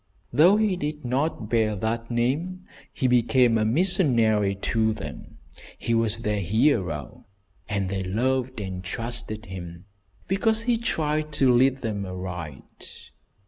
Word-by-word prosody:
Though 175 +8 +6
he 215 -3 +2
did 150 -2 -4
not 130 -2 -1
bear 110 -2 +1
that 115 +3 -2
name, 150 +11 -1 0.3
he - - -3
became 120 -1 +4
a 110 - +2
missionary 115 - +2
to 110 +2 0
them. 110 - -9 0.4
He 115 - -2
was 115 -1 +1
their 105 -2 -1
hero, 95 - 0 0.4
and 100 -2 -1
they 95 0 -2
loved 125 +5 -1
and 95 -2 -5
trusted 115 +2 -5
him 85 -3 -8 0.4
because 220 +4 +1
he 235 -1 +1
tried 155 -8 -1
to 135 -3 +4
lead 130 +2 +3
them 105 -3 -2
aright. 90 -6 -8
115 Hz, 135 wpm, -25 LUFS, 105-145 Hz, 0.4 s, Though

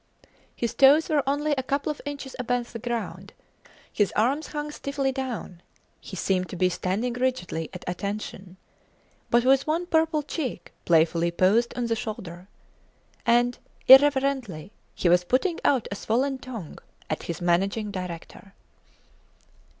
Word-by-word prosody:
His 235 -2 -2
toes 285 +5 +5
were 300 -2 +3
only 290 +2 0
a 265 - -1
couple 280 +3 -1
of 300 - -8
inches 280 -2 -6
above 245 -1 -2
the 230 - -5
ground; 235 0 -5 0.6
his 205 -2 +2
arms 265 +8 +1
hung 295 0 -4
stiffly 280 -2 -2
down; 255 -9 -5 0.4
he - - -9
seemed 185 -1 0
to - - -6
be 180 +1 +2
standing 195 +7 -2
rigidly 245 -11 -2
at 180 -1 -9
attention, 190 0 -5 0.7
but 240 +1 +3
with 270 +2 +4
one 330 +3 0
purple 320 -3 +1
cheek 270 - -5
playfully 165 +1 +3
posed 200 +8 +2
on 245 - 0
the 230 -1 0
shoulder. 190 -6 -7 0.8
And, 240 +1 +3 0.3
irreverently, 265 - +5 0.2
he - - 0
was 175 +1 +5
putting 270 - 0
out 260 -5 +2
a - - -2
swollen 260 +6 0
tongue 230 -12 -8 0.3
at 155 - -3
his 170 - -5
Managing 195 +5 0
Director. 185 +1 -8
235 Hz, 140 wpm, -26 LUFS, 185-275 Hz, 0.8 s, toes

